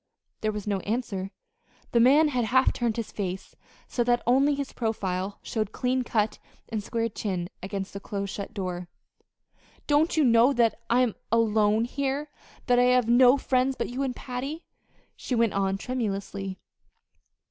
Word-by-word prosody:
There 215 Hz, -, 0 dB
was 210 Hz, -1 st, -5 dB
no 200 Hz, -2 st, 0 dB
answer. 205 Hz, -2 st, -3 dB, 0.6 s
The 235 Hz, -, +3 dB
man 285 Hz, +6 st, +6 dB
had 250 Hz, -4 st, 0 dB
half 260 Hz, +3 st, +3 dB
turned 235 Hz, -2 st, -1 dB
his 230 Hz, -, -4 dB
face 190 Hz, -2 st, -5 dB, 0.3 s
so 240 Hz, -, 0 dB
that 240 Hz, 0 st, +1 dB
only 275 Hz, +4 st, +4 dB
his 280 Hz, -1 st, -4 dB
profile 200 Hz, -4 st, -2 dB
showed 215 Hz, -3 st, -2 dB
clean 255 Hz, 0 st, 0 dB
cut 215 Hz, -3 st, 0 dB, 0.3 s
and 220 Hz, -3 st, -3 dB
square 230 Hz, +1 st, -1 dB
chinned 190 Hz, -5 st, -4 dB
against 195 Hz, 0 st, -5 dB
the 200 Hz, -, -5 dB
close 200 Hz, -1 st, -4 dB
shut 200 Hz, -, -6 dB
door. 180 Hz, -2 st, -4 dB, 1.0 s
"Don't 300 Hz, +3 st, +2 dB
you 310 Hz, -, +5 dB
know 240 Hz, +1 st, +5 dB
that 235 Hz, -2 st, +2 dB
I 240 Hz, +2 st, +4 dB
am 245 Hz, -4 st, +2 dB, 0.2 s
alone 220 Hz, -1 st, +3 dB
here 280 Hz, +3 st, -2 dB, 0.3 s
that 245 Hz, -2 st, +4 dB
I 245 Hz, -, +5 dB
have 250 Hz, -2 st, +3 dB
no 245 Hz, +2 st, +6 dB
friends 260 Hz, 0 st, +1 dB
but -, -, -3 dB
you 250 Hz, +3 st, -4 dB
and 260 Hz, -2 st, -1 dB
Patty?" 270 Hz, +6 st, -5 dB, 0.5 s
she 255 Hz, -, -3 dB
went 230 Hz, -2 st, +2 dB
on 195 Hz, -1 st, 0 dB
tremulously. 200 Hz, -5 st, -3 dB
230 Hz, 165 wpm, -27 LUFS, 200-255 Hz, 1.0 s, man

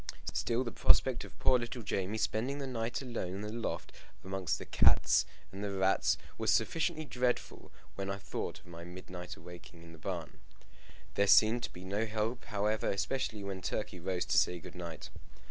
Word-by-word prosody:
Still, 120 Hz, +2 st, +1 dB
the 120 Hz, -, -4 dB
prospect -, -, +4 dB
of -, -, -14 dB
poor 130 Hz, -, +4 dB
little 120 Hz, 0 st, -4 dB
Jamie 100 Hz, +1 st, -1 dB
spending 120 Hz, +6 st, 0 dB
the 140 Hz, -, -3 dB
night 120 Hz, 0 st, -2 dB
alone 115 Hz, -8 st, -3 dB
in 100 Hz, -, -4 dB
the 105 Hz, 0 st, -4 dB
loft 115 Hz, 0 st, -3 dB, 0.3 s
amongst 95 Hz, -3 st, -1 dB
the -, -, -7 dB
cats -, -, +5 dB, 0.2 s
and 100 Hz, +2 st, -6 dB, 0.2 s
rats 95 Hz, 0 st, +3 dB, 0.2 s
was -, -, +1 dB
sufficiently 160 Hz, -1 st, +2 dB
dreadful 125 Hz, -2 st, -1 dB, 0.2 s
when 100 Hz, 0 st, -4 dB
I 100 Hz, -, -1 dB
thought 100 Hz, -2 st, -4 dB
of -, -, -25 dB
my 85 Hz, -1 st, -9 dB
midnight 90 Hz, 0 st, -7 dB
awaking 85 Hz, 0 st, -12 dB
in 85 Hz, -, -12 dB
the 80 Hz, -, -13 dB
barn. -, -, -4 dB, 0.7 s
There 100 Hz, +4 st, +3 dB
seemed 110 Hz, +4 st, +7 dB
to -, -, -8 dB
be 90 Hz, +1 st, -10 dB
no 105 Hz, +4 st, 0 dB
help, 110 Hz, +3 st, -1 dB
however, 105 Hz, -1 st, 0 dB
especially 105 Hz, +1 st, -1 dB
when 95 Hz, -1 st, -4 dB
Turkey 95 Hz, -1 st, -3 dB
rose 90 Hz, +1 st, -1 dB
to -, -, +5 dB
say 90 Hz, -, +2 dB
good 90 Hz, 0 st, -10 dB
night. 85 Hz, -3 st, -7 dB
100 Hz, 180 wpm, -33 LUFS, 90-115 Hz, 0.7 s, seemed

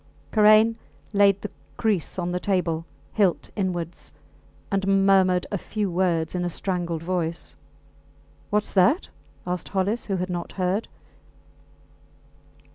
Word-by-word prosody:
Karain 215 Hz, +1 st, +6 dB, 0.4 s
laid 200 Hz, -1 st, +5 dB
the 210 Hz, -, -5 dB, 0.3 s
kriss 205 Hz, -7 st, 0 dB
on 175 Hz, -1 st, -2 dB
the 180 Hz, -, -1 dB
table, 175 Hz, -4 st, -1 dB, 0.3 s
hilt 195 Hz, -5 st, +1 dB
inwards, 175 Hz, -4 st, -3 dB, 0.6 s
and 195 Hz, 0 st, +2 dB
murmured 185 Hz, -2 st, +4 dB
a 200 Hz, -, -1 dB
few 210 Hz, -1 st, -3 dB
words 170 Hz, -3 st, +1 dB
in 180 Hz, -1 st, -1 dB
a 175 Hz, -, -1 dB
strangled 170 Hz, -2 st, -3 dB
voice. 170 Hz, -2 st, -3 dB, 0.9 s
Whats 210 Hz, 0 st, 0 dB
that? 195 Hz, -, +3 dB, 0.4 s
asked 180 Hz, 0 st, -3 dB
Hollis, 200 Hz, +4 st, -1 dB
who 195 Hz, -, 0 dB
had 185 Hz, 0 st, -2 dB
not 175 Hz, -1 st, -4 dB
heard. 190 Hz, +3 st, -1 dB
185 Hz, 120 wpm, -25 LUFS, 175-200 Hz, 0.9 s, Karain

